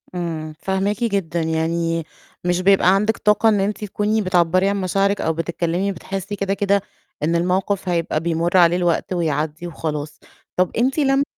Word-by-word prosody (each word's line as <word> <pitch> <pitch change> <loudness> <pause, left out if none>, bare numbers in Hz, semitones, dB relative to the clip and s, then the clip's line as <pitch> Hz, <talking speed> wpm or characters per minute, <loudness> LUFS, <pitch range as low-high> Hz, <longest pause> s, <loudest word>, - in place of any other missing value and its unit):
إمم، 160 -3 -4
فاهماكِ 195 +4 -1
جدًا، 195 -7 -1
يعني 165 +1 -1 0.4
مش 180 0 +1
بيبقى 190 0 +5
عندِك 210 +2 +1
طاقة 210 +2 +3
إن 210 -2 +2
أنتِ 205 +2 -2
تكوني 210 +2 0
بتعبّري 185 0 +2
عن 200 0 -1
مشاعرِك 195 +2 +1
أو 160 - 0
بتتكلّمي، 170 +3 -1
بتحسّي 195 +2 -5
كده 195 -1 -1
كده 200 0 +1 0.4
إن 165 +3 +1
الموقِف 185 +2 0
هيبقى 170 -3 0
بيمُرّ 170 +2 0
عليه 175 0 +5
الوقت 175 +1 0
ويعدّي 155 -1 -2
وخلاص. 150 -3 -5 0.4
طَب 185 0 +2
أنتِ 260 +6 +1
لم 270 -1 +3
180 Hz, 160 wpm, -21 LUFS, 165-200 Hz, 0.4 s, بيبقى